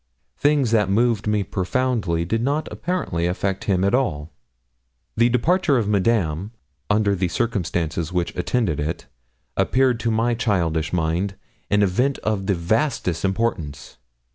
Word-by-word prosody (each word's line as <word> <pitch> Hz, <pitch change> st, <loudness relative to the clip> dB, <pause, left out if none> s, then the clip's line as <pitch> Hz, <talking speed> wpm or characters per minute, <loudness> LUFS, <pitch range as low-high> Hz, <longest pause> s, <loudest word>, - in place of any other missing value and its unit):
Things 145 Hz, -5 st, +2 dB
that 105 Hz, -4 st, +3 dB
moved 110 Hz, +1 st, +2 dB
me 105 Hz, -1 st, +1 dB
profoundly 95 Hz, -4 st, -1 dB
did 115 Hz, +6 st, -1 dB
not 145 Hz, +5 st, 0 dB
apparently 155 Hz, -, -2 dB
affect 95 Hz, +2 st, -2 dB
him 95 Hz, -2 st, +1 dB
at 100 Hz, -, +2 dB
all. 85 Hz, -, 0 dB, 0.8 s
The 120 Hz, +2 st, +4 dB
departure 145 Hz, +4 st, +2 dB
of 110 Hz, -4 st, 0 dB
Madame, 100 Hz, -2 st, +1 dB, 0.4 s
under 105 Hz, -1 st, +3 dB
the 95 Hz, -1 st, 0 dB
circumstances 85 Hz, -, -1 dB
which 90 Hz, -1 st, -1 dB
attended 90 Hz, -, 0 dB
it, 75 Hz, -1 st, -3 dB, 0.5 s
appeared 130 Hz, -2 st, +2 dB
to 115 Hz, -, -1 dB
my 115 Hz, +2 st, +1 dB
childish 85 Hz, -9 st, 0 dB
mind 90 Hz, +3 st, -1 dB, 0.3 s
an 105 Hz, 0 st, +3 dB
event 125 Hz, +9 st, +1 dB
of 100 Hz, -3 st, -1 dB
the 100 Hz, -, +2 dB
vastest 90 Hz, -, 0 dB
importance. 95 Hz, -, -2 dB
100 Hz, 140 wpm, -22 LUFS, 85-120 Hz, 0.8 s, The